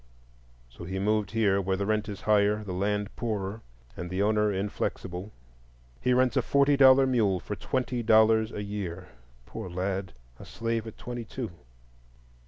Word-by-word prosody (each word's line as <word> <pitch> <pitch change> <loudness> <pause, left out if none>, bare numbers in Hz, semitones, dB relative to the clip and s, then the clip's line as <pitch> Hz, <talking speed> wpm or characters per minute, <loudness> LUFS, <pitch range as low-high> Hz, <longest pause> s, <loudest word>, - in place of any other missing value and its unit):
So - - -12
he 95 +2 -4
moved 105 0 +1
here, 100 -3 +2
where 95 0 -1
the 100 - -1
rent 105 0 0
is 100 - -6
higher, 105 0 +2
the 95 -3 -5
land 105 +2 -1
poorer, 105 -2 -3 0.3
and 90 - -6
the 95 +2 0
owner 105 0 +2
inflexible; 95 -1 -3 0.7
he 125 - +1
rents 125 +1 +3
a 130 - +4
forty 140 +3 +3
dollar 135 -1 +7
mule 110 -8 +2
for 105 - -5
twenty 125 +4 -2
dollars 110 0 +4
a 105 - -5
year. 95 -3 -5 0.4
Poor 90 - -7
lad!—a 90 -10 -5
slave 115 -1 -3
at 110 - -9
twenty 120 -1 -6
two. 115 -2 -6
105 Hz, 160 wpm, -28 LUFS, 95-115 Hz, 0.7 s, dollar